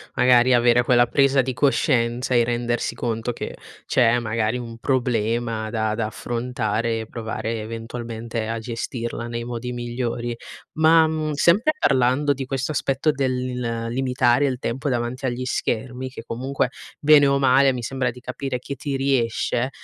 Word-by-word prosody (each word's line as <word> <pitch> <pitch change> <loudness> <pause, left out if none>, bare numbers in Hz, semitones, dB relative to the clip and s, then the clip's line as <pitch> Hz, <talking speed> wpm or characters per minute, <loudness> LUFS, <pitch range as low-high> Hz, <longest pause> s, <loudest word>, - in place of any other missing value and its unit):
magari 125 0 +5
avere 120 0 +4
quella 120 0 +4
presa 135 +1 +3
di 130 - -3
coscienza 125 -3 +1
e 120 -1 +5
rendersi 120 0 -1
conto 115 0 -2
che - - -6 0.3
c'è, 120 -2 +3
magari, 115 0 -1
un 115 -2 -8
problema 115 -3 0
da 110 -1 -1
da 110 -1 -1
affrontare 115 -1 -2
e 110 - -6
provare 115 0 -4
eventualmente 115 0 -5
a 115 +1 -2
gestirla 115 +1 -4
nei 115 0 -4
modi 120 +1 -5
migliori. 120 0 -3 0.4
Ma, 160 +1 +5
mhmm, 155 -1 -2
sempre 195 - +3
parlando 135 - +2
di 135 -1 -5
questo 135 +2 -2
aspetto 140 +1 +1
del 125 -4 -2
limitare 125 +1 +2
il 130 -2 -1
tempo 125 +3 -3
davanti 125 +1 -2
agli 130 0 -2
schermi, 125 +1 -2
che 130 - -9
comunque, 130 +2 -2 0.3
bene 145 -1 +6
o 140 0 +3
male, 135 0 +4
mi 125 -2 -5
sembra 130 +1 -1
di 120 - -8
capire 135 +1 -4
chi 140 +3 -7
ti 140 0 -4
riesce, 130 -2 0
120 Hz, 155 wpm, -23 LUFS, 115-135 Hz, 0.4 s, bene